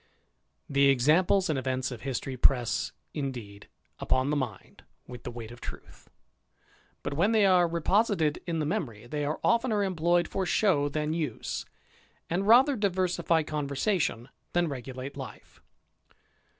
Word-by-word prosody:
The 140 0 +3
examples 160 +9 +3
and 155 -5 0
events 130 0 -2
of 120 - -7
history 135 0 -3
press, 125 -1 +2 0.2
indeed, 120 -8 -6 0.3
upon 130 +2 +1
the - - +1
mind 125 -8 -5 0.2
with 125 -1 -10
the - - -6
weight 115 -2 -8
of 120 - -12
truth; - - -10 0.9
but - - -3
when 185 +10 +2
they 215 -2 +5
are 180 -2 +5
reposited 170 -1 +1
in 170 -1 -1
the 155 - 0
memory, 140 - -3
they 145 +4 -3
are 150 +2 -2
oftener 230 -3 +2
employed 175 -2 +1
for 195 - -2
show 175 -6 +2
than 150 +1 -1
use, 155 -9 -3 0.6
and 190 +4 0
rather 260 +5 +6
diversify 180 -5 +1
conversation 150 - -1 0.2
than 175 -1 +2
regulate 130 0 -6
life. 135 -3 -10
150 Hz, 140 wpm, -28 LUFS, 130-185 Hz, 0.9 s, rather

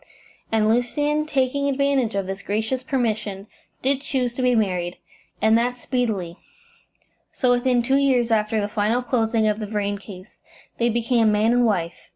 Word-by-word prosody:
And 220 -1 +2
Lucian, 290 +6 +1
taking 280 0 0
advantage 275 -5 +1
of 195 -1 -1
this 195 +1 -5
gracious 220 +5 -2
permission, 220 -7 -2 0.4
did 270 +1 +1
choose 255 -4 -1
to 255 - -4
be 250 -1 +3
married, 180 -5 -1 0.5
and 220 0 +5
that 245 +1 -1
speedily; 215 -9 -2 1.0
so 250 -2 +1
within 245 0 +2
two 265 +3 +2
years 255 -4 +2
after 215 0 +1
the 205 - -1
final 215 +4 0
closing 225 -3 +1
of 210 0 0
the 215 - -4
Vrain 205 -1 -2
case 195 -1 -12 0.4
they 235 0 +2
became 230 -1 +2
man 210 +2 +2
and 245 -1 +3
wife. 175 -5 -2
230 Hz, 165 wpm, -23 LUFS, 210-255 Hz, 1.0 s, and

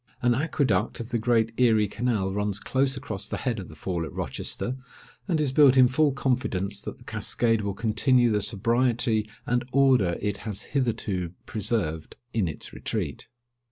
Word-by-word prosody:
An 120 0 +4
aqueduct 130 - 0
of 115 0 -6
the 120 -2 0
great 115 -1 +2
Erie 110 -4 +4
canal 105 -3 -1
runs 105 -1 -1
close 135 +4 0
across 105 -4 -5
the - - -3
head 120 -5 -2
of 95 - -8
the 80 - -11
Fall 85 +2 -3
at 80 - -6
Rochester, 125 - -3 0.5
and 170 -5 +1
is 145 -3 +1
built 135 -1 +6
in 130 -1 +8
full 145 +4 +2
confidence 105 -7 -1
that - - -7
the - - -17
cascade 115 -2 0
will 100 -1 -3
continue 115 +3 +3
the 105 -1 +1
sobriety 115 +1 +1 0.2
and 120 0 +1
order 130 -10 +4
it 105 -1 -2
has 105 -3 -6
hitherto 105 - -1
preserved 100 -8 -2 0.2
in 110 -6 +1
its 80 - -7
retreat. - - -4
115 Hz, 170 wpm, -26 LUFS, 100-125 Hz, 0.5 s, in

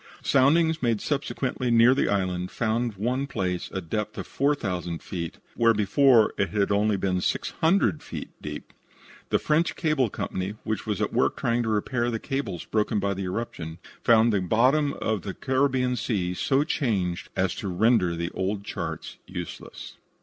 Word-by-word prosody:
Soundings 160 +4 +3
made 115 -4 +1
subsequently 135 -2 -2
near 115 +2 +6
the 135 - +1
island 90 -2 -1
found 115 +1 -1
in 100 - -8
one 130 +4 0
place 90 -8 -2
a 95 - -3
depth 105 +5 -3
of - - -4
4,000 95 - -1
feet 85 -3 -5 0.2
where 115 -1 +4
before 110 +3 +4
it 100 - +1
had 100 -2 +1
been 100 - +3 0.3
only 90 -1 +1
600 160 - +1
feet 80 - -7
deep. 75 0 -7 0.6
The - - +3
French 160 +2 +1
Cable 155 -7 +1
Company, 95 +1 -4
which 110 0 -3
was 105 -3 -1
at - - -2
work - - +2
trying 120 0 +1
to 115 - -1
repair 120 +3 0
the 115 - -1
cables 135 -8 -4
broken 110 0 0
by 100 0 0
the 95 0 -4
eruption, 90 -5 -4 0.3
found 115 -1 +5
the 100 - +2
bottom 130 - +3
of 110 -3 -2
the 95 0 -6
Caribbean 130 -1 +1
Sea 100 -7 -1
so 135 +9 +2
changed 100 - -1
as - - +1
to - - -5
render 90 -2 +2
the 85 +1 -3
old 100 +2 -2
charts - - -5
useless. 90 -2 -8
110 Hz, 170 wpm, -26 LUFS, 95-130 Hz, 0.6 s, near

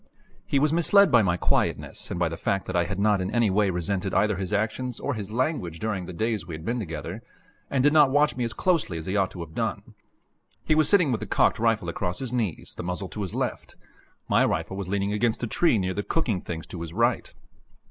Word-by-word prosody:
He - - +1
was 150 +2 +2
misled 190 +2 +5
by 120 -3 +6
my 90 -4 +1
quietness - - -1
and 85 - -3
by 90 - +2
the 80 - -4
fact 95 +3 -1
that 95 - -4
I 85 -1 +3
had 95 +1 -4
not 100 -1 +2
in 95 - -2
any 120 -4 +2
way 100 +1 +2
resented 95 +2 -2
either 105 -1 +3
his 95 0 -4
actions 110 +4 -1
or 140 - -2
his 105 -4 -5
language 120 - -1
during 100 -3 -3
the - - -6
days 110 +3 -1
we 85 - -5
had 80 +1 -9
been 120 +3 -1
together, 85 -7 -5 0.5
and 130 -2 +1
did 145 +1 +4
not 150 -3 +6
watch 145 +2 +3
me 125 - -2
as 115 - -1
closely 155 - 0
as 80 - -6
he 95 - -2
ought 95 -2 +2
to 90 - -8
have 80 -1 -8
done. - - -3 0.7
He - - +2
was 155 0 +3
sitting 180 -9 +4
with 115 - 0
the - - -6
cocked - - +2
rifle 115 -5 +1
across 90 +1 -2
his 130 -2 -5
knees, 110 -9 -2
the - - -5
muzzle 90 +2 -4
to 105 - -5
the - - -6
left. - - -3 0.5
My - - +4
rifle 95 - -1
was 100 -2 -4
leaning 100 +1 -1
against 115 +2 0
a - - +2
tree 165 +1 +2
near 95 -2 -1
the 100 - -2
cooking 110 - -1
things 80 -2 -6
to 85 - -8
his 85 -1 -6
right. 120 +4 +1
105 Hz, 245 wpm, -26 LUFS, 90-125 Hz, 0.7 s, by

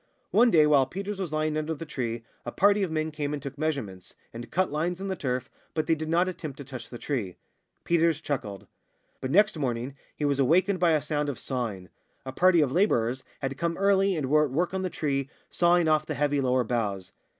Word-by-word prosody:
One 240 - +5
day, 160 -7 +5
while 140 -3 +4
Peters 195 +5 -5
was 180 -5 -3
lying 155 0 0
under 155 +1 -2
the 165 - -7
tree, 120 -6 -4 0.2
a 120 - -5
party 205 +6 +3
of 190 - 0
men 155 0 -1
came 150 -1 -3
and 150 - -2
took 140 0 -7
measurements, 140 - -4 0.2
and 120 +1 -8
cut 185 -1 0
lines 170 +4 -1
in 195 0 -4
the 190 - -1
turf, 130 -5 -2 0.3
but 155 -1 0
they 165 - +3
did 155 0 -3
not 175 +3 +3
attempt 155 -6 -6
to 140 - -7
touch 130 -4 -9
the 120 - -8
tree. 115 -10 -3 0.5
Peters 165 -2 +2
chuckled. 105 - -4 0.5
But 130 - -4
next 205 +2 +3
morning 125 -1 -2 0.2
he 150 - -2
was 140 -1 +1
awakened 180 +8 +3
by 170 -2 +4
a 150 -2 +1
sound 150 -1 -1
of 135 - -4
sawing. 110 -9 -4 0.4
A 130 - -4
party 175 +4 +4
of 140 -4 +1
labourers 130 - +1 0.2
had 135 0 -3
come 170 0 -1
early, 195 -1 +3
and 150 -5 -2
were 150 +2 +4
at - - -4
work 170 +8 -1
on 190 - -1
the 185 - -1
tree, 140 -5 -2 0.2
sawing 175 -1 +3
off 155 -1 +2
the 155 - -3
heavy 145 -1 +1
lower 130 -1 +2
boughs. 105 -6 -2
150 Hz, 225 wpm, -27 LUFS, 130-170 Hz, 0.5 s, One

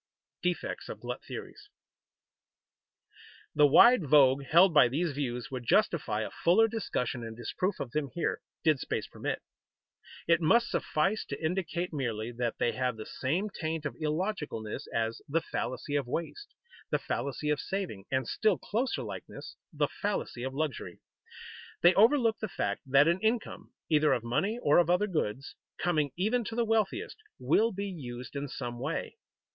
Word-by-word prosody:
[Sidenote: 180 -1 +2
Defects - - -6
of - - -6
glut - - -6
theories] 415 0 -9 1.8
The 150 -1 +6
wide 235 - +7
vogue 135 -1 +5
held 170 +5 +6
by 150 -5 +7
these 155 +7 -1
views 125 -5 -4
would 130 -2 -4
justify 115 - +2
a - - -4
fuller 190 +7 +4
discussion 130 - -3
and 115 0 -7
disproof 185 - -2
of 125 - -4
them 150 -1 -1
here, 170 - -1 0.2
did 155 -4 +3
space - - -3
permit. - - -4 0.8
It 170 0 +4
must 235 +9 +3
suffice 190 +8 0
to 140 - -6
indicate 175 +1 -2
merely 120 -5 -2
that 120 -1 -2
they 120 - +1
have 125 -3 -1
the 110 - -7
same 175 +11 -2
taint 160 -3 -3
of 145 - -2
illogicalness 155 - -3
as 115 0 -1
the 160 +4 +2
"fallacy 145 -1 -4
of 140 -3 0
waste," 170 - -4 0.4
the - - +2
"fallacy 150 +2 -2
of 150 - 0
saving" 180 - -4
and, 130 -2 0
still 215 -4 +2
closer 240 +5 -2
likeness, - - -8 0.2
the - - +1
"fallacy 200 - -3
of 130 +1 -4
luxury." 155 -3 -3 0.8
They 175 +1 +8
overlook 230 +1 +4
the 215 - -3
fact - - -2
that 140 +3 +5
an 170 +2 +2
income, 220 +2 -2 0.2
either 150 -2 +4
of 120 -3 -1
money 195 - 0
or 145 +3 +5
of 175 - +3
other 180 +4 +3
goods, 140 - -3 0.2
coming 155 -5 +1
even 220 +6 +1
to 225 - -5
the 235 0 +1
wealthiest, 225 - 0 0.2
will 225 +2 +2
be 200 +1 -4
used 125 - -7
in 140 +1 -3
some 120 -3 -6
way. 150 - -3
155 Hz, 165 wpm, -30 LUFS, 130-195 Hz, 1.8 s, They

